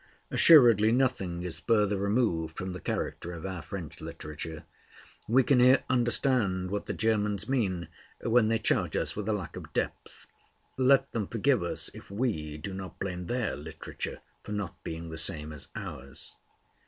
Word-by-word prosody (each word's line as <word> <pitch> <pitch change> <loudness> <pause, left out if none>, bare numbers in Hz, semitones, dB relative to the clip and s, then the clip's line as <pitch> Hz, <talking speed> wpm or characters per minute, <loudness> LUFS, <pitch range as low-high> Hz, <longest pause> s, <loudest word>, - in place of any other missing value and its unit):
Assuredly 115 - +7
nothing 115 -9 0
is 90 -2 -4
further 105 -3 +2
removed 100 -6 0
from 95 -1 -4
the 90 - -6
character 85 0 -3
of 85 0 -7
our 95 -3 -4
French 85 -2 -7
literature. 75 +1 -7 0.6
We 130 +4 +5
can 130 0 +4
here 130 +2 +6
understand 120 -7 +2
what 100 0 -3
the - - -2
Germans 105 -3 0
mean 95 - 0 0.3
when 115 -1 +3
they 115 +1 +2
charge 110 - +1
us - - 0
with 105 +1 -3
a - - +2
lack 95 -5 -4
of - - -9
depth. - - -3 0.5
Let 135 +1 +4
them 110 -4 -2
forgive 125 +3 +2
us 85 - -3
if - - -12
we 100 -9 -2
do 95 +6 -6
not 95 -1 -7
blame 90 -2 -4
their 120 -3 -1
literature 80 +2 -6 0.2
for 105 - -6
not 105 -4 -5
being 80 0 -6
the 80 - -4
same 75 -1 -2
as 75 - -7
ours. 70 +2 -8
100 Hz, 165 wpm, -29 LUFS, 85-120 Hz, 0.6 s, Assuredly